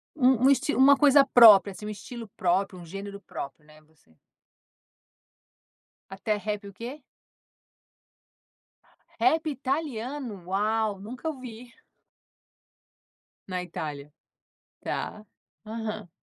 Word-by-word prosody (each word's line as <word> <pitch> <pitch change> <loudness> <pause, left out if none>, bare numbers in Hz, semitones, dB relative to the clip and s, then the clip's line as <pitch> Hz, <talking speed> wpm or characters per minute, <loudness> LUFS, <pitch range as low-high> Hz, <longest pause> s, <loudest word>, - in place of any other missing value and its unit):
Um 255 -3 +3
um - - +7
esti 280 +2 +2
uma 275 +2 +6
coisa 280 -1 +6
própria, 220 -6 +8
assim, 205 +2 -10
um - - -4
estilo 230 +2 -8
próprio, 185 +1 0
um 175 - -11
gênero 200 +3 -8
próprio, 150 -4 -8
né. 155 0 -19
Você 155 0 -31 2.0
Até 195 +2 -2
rap 210 0 -4
o 200 - -11
quê? 245 +9 -8 2.2
Rap 320 0 +2
italiano? 265 - -4
Uau, 210 +2 0
nunca 240 +9 -7
ouvi. 250 -4 -9 1.7
Na 185 -1 -3
Itália. 150 -4 -7 0.7
Tá. 215 - -4 0.4
Aham. 215 -2 -5
215 Hz, 105 wpm, -27 LUFS, 195-260 Hz, 2.2 s, própria